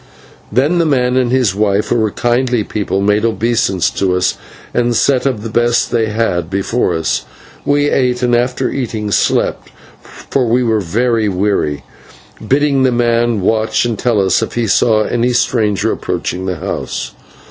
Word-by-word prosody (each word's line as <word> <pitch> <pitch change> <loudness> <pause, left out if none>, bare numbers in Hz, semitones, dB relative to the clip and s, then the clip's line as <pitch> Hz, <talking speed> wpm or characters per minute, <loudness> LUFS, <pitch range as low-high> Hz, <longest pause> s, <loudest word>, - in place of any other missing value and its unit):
Then 145 +10 +2
the 170 - +2
man 125 -3 +1
and 125 -2 +1
his 125 -6 +2
wife, 100 0 0
who - - +1
were 110 -2 +1
kindly 120 +1 0
people, 100 -2 -2
made 105 +1 +2
obeisance 110 -4 0
to 95 -2 0
us, 90 +1 +1 0.4
and 120 -1 +1
set 135 +2 +2
of 115 -6 -2
the 115 - -4
best 120 +1 +1
they 115 -2 +1
had 100 -6 -1
before 100 +5 -1
us. 80 -1 -1 0.4
We 145 0 +2
ate, 125 -2 +1
and, 120 -1 +3
after 125 +1 0
eating, 110 -5 -3
slept, - - 0 0.3
for 130 -3 -3
we 125 +2 +2
were 110 -3 +1
very 110 +4 0
weary, 90 -7 -1 0.6
bidding 140 +1 +2
the 130 -1 +3
man 120 -2 +1
watch 110 +4 +1
and 115 -3 -2
tell 120 -4 +1
us 95 +2 +2
if 110 - -3
he 120 -1 -1
saw 110 +1 +3
any 120 +2 0
stranger 110 -5 +1
approaching 95 +1 -3
the 90 - -2
house. 60 -5 -4
115 Hz, 170 wpm, -15 LUFS, 100-125 Hz, 0.6 s, and